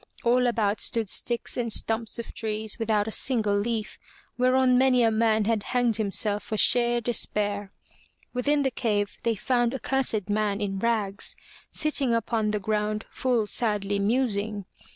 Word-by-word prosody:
All 245 +1 +3
about 220 -3 0
stood 225 -4 +1
sticks 240 +3 +1
and 235 -2 -1
stumps 225 +1 0
of 235 - -7
trees 220 0 -4
without 215 -2 0
a - - -3
single 220 -4 +1
leaf, 215 +1 -3 0.4
whereon 255 0 +3
many 255 -1 +4
a 225 - +3
man 220 -1 +2
had 225 -1 0
hanged 240 -1 0
himself 210 0 0
for 215 +1 -4
sheer 240 +1 +3
despair. 205 -3 -1 0.6
Within 285 +4 +1
the 265 - 0
cave 205 -4 -2
they 230 -1 0
found 240 +3 0
a - - -4
cursed 235 -6 0
man 210 -1 0
in 195 -2 -3
rags, 210 -3 0 0.4
sitting 285 -6 +2
upon 225 -2 -1
the 210 0 -1
ground 210 +1 -2
full 245 -4 0
sadly 205 -2 -1
musing. 210 -2 -1
225 Hz, 155 wpm, -26 LUFS, 210-240 Hz, 0.6 s, many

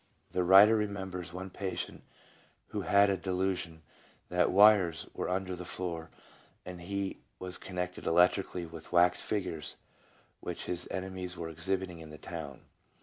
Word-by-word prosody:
The 90 - +1
writer 100 +5 +8
remembers 95 -4 -3
one 95 +1 -6
patient 95 -3 -4 0.7
who - - -3
had 100 0 +5
a 95 - 0
delu 95 +1 0
sion 80 -2 -7 0.5
that 90 0 +3
wires 100 -5 +6
were - - -3
under 95 0 -1
the 90 - -7
floor 85 -2 -4 0.6
and 90 -1 -8
he 100 +2 -3 0.2
was 90 0 -3
connected 90 -1 -4
electrically 90 +1 +3
with 80 -1 -11
wax 90 0 +4
figures 90 -7 -2 0.6
which 90 - -5
his 90 -1 -3
enemies 95 -1 -4
were 85 -1 -4
exhibiting 90 +1 -2
in 80 -1 -10
the 75 - -10
town. - - -7
90 Hz, 145 wpm, -31 LUFS, 85-95 Hz, 0.7 s, writer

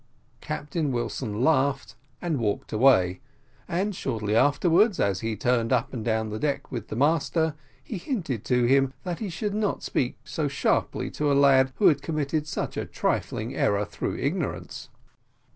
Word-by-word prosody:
Captain 150 -1 -3
Wilson 120 -2 -2
laughed, 140 -4 +2 0.3
and 165 -6 0
walked 105 -3 -2
away; 100 -7 +4 0.5
and 190 +4 -1
shortly 110 - -2
afterwards, 170 - +4
as 100 -2 +1
he 115 +1 -2
turned 115 0 +1
up 125 -1 +1
and 115 -4 -4
down 110 -1 0
the 110 - -4
deck 145 +1 -2
with 115 -4 -5
the - - -5
master, 160 +3 +2 0.3
he 210 - -5
hinted 170 - -3
to 125 -1 +2
him 135 +2 +3
that 175 -2 -4
he 215 - -3
should 205 +4 -3
not 210 -1 -1
speak 125 - -1
so 155 -2 -2
sharply 140 0 0
to 150 -1 0
a - - +3
lad 135 -1 +5
who 210 - +1
had 145 -2 +4
committed 155 0 -2
such - - -3
a - - -2
trifling 115 +5 -2
error 100 -4 +1
through - - -4
ignorance. - - -3
135 Hz, 165 wpm, -26 LUFS, 115-160 Hz, 0.5 s, lad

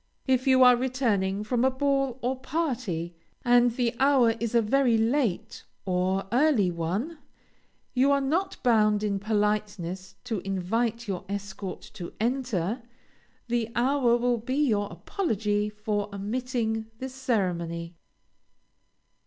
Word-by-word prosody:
If 260 0 +1
you 260 -1 +6
are 250 -1 +8
returning 225 -6 0
from 240 +2 0
a 265 - +5
ball 275 -1 0
or 255 +2 0
party, 250 - -2 0.3
and 245 0 +5
the 235 0 -1
hour 265 -4 +5
is 235 0 -2
a 235 - +6
very 245 +1 +3
late 230 -3 0 0.2
(or 185 +1 0
early) 245 - +3
one, 190 - -3 0.7
you 265 +2 +3
are 280 - +4
not 335 +8 -1
bound 215 -4 +3
in 200 -2 0
politeness 205 -3 -2
to 220 -4 -2
invite 220 +6 -2
your 190 -3 -3
escort 200 -1 -5
to 180 -5 -8
enter; 235 -3 -1 0.7
the 235 -1 0
hour 245 -1 +3
will 240 0 +1
be 255 +4 -3
your 205 -3 0
apology 210 - -1
for 210 -1 -3
omitting 225 +1 -2
the 260 - -5
ceremony. 180 - -2
230 Hz, 130 wpm, -27 LUFS, 200-255 Hz, 0.7 s, are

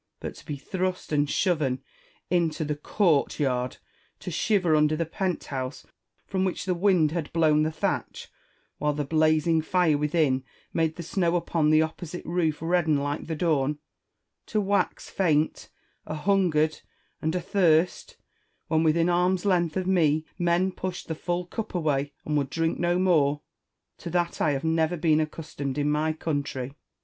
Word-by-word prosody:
But - - -5
to - - -14
be 150 - -3
thrust 185 +5 -3
and 145 -1 +2
shoven 145 -8 0 0.5
into 165 -3 +1
the 150 0 -1
court 160 0 +1
yard; 125 -3 0 0.4
to 180 - -5
shiver 180 -2 +2
under 150 0 +3
the 165 +1 -1
pont 180 +2 -2
house 130 -1 -5 0.4
from 190 -1 -1
which 185 -1 -2
the 185 - +1
wind 175 -4 +3
had 165 -2 -3
blown 155 -2 +4
the 155 +1 +1
thatch, 155 - -3 0.5
while 150 0 +1
the 145 0 -2
blazing 155 +2 +3
fire 160 -2 +2
within 150 -3 +1 0.3
made 160 -1 +1
the 170 - -6
snow 175 0 0
upon 165 -3 +1
the 155 0 +5
opposite 165 +2 -6
roof 165 -3 -1
redden 165 -3 +2
like 145 +2 -3
the 160 - -2
dawn; 150 -3 +1 0.7
to 215 - 0
wax 200 0 0
faint, 160 -5 0 0.4
ahungered, 155 -2 +1 0.4
and 160 +2 -1
athirst, 175 -2 +1 0.5
when, 160 0 +3
within 165 +1 +3
arm's 180 +2 +2
length 175 -4 +2
of 185 - -1
me, 160 -4 +2
men 175 +2 +2
pushed 185 -1 -5
the - - 0
full 175 +2 -2
cup 215 +3 -6
away, 145 -4 0
and 150 - -1
would 140 -2 0
drink 165 +2 -1
no 175 +1 +2
more, 150 -6 +2 0.3
— - - -57
to - - -6
that 175 0 -1
I 150 - +3
have 135 - -3
never 160 +1 +1
been 155 -1 +3
accustomed 150 -3 -4
in 145 0 +1
my 155 +1 +1
country. 140 -4 -3
160 Hz, 165 wpm, -26 LUFS, 150-175 Hz, 0.7 s, the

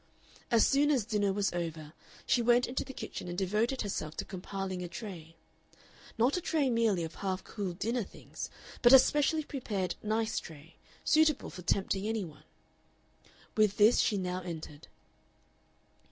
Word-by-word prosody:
As 230 -2 +5
soon 285 +2 +3
as 260 -8 +2
dinner 205 -3 +1
was 200 -1 0
over 160 -3 -4 0.3
she 245 - +3
went 240 +1 +4
into 255 - -2
the 265 - -9
kitchen 250 - -7
and 175 0 -5
devoted 215 +7 0
herself 155 -6 -4
to - - -3
compiling 190 0 -5
a 180 - -4
tray 170 -3 -8 0.8
not 240 +5 +3
a 360 - -1
tray 300 -6 +1
merely 225 -7 +2
of 160 0 -5
half 190 0 -3
cooled 190 -5 -5
dinner 235 +4 0
things, 200 - -8 0.3
but 240 +1 +7
a - - +13
specially 295 +3 +2
prepared 205 - -3
"nice" 220 +1 0
tray, 160 +1 -12 0.3
suitable 310 -2 +3
for 180 - -9
tempting 195 +3 0
any 220 -3 -1
one. 155 -3 -14 1.1
With 215 -2 +3
this 215 +3 +6
she 210 - +2
now 185 -1 -2
entered. 160 -4 -8
205 Hz, 160 wpm, -31 LUFS, 180-240 Hz, 1.1 s, a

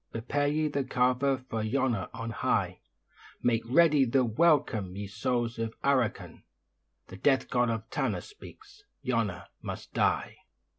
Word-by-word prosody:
Prepare 140 +5 -1
ye 155 +1 +1
the 140 -2 -1
'cava' 130 +2 +2
for 115 -3 -2
'Yona' 115 -3 0
on 115 0 -5
high; - - 0 0.6
Make 115 -2 +2
ready 150 +1 +5
the 130 +1 +2
welcome, 110 - +2
ye 100 +1 -4
souls 115 +3 -2
of 115 0 -3
Arrochin. 130 -5 0 0.7
The 95 - -9
Death 135 +6 +2
God 125 -2 +2
of 115 -1 -3
Tanna - - -1
speaks 420 0 -14 0.2
Yona - - -1 0.2
must - - -7
die. - - +1
125 Hz, 140 wpm, -29 LUFS, 115-140 Hz, 0.7 s, ready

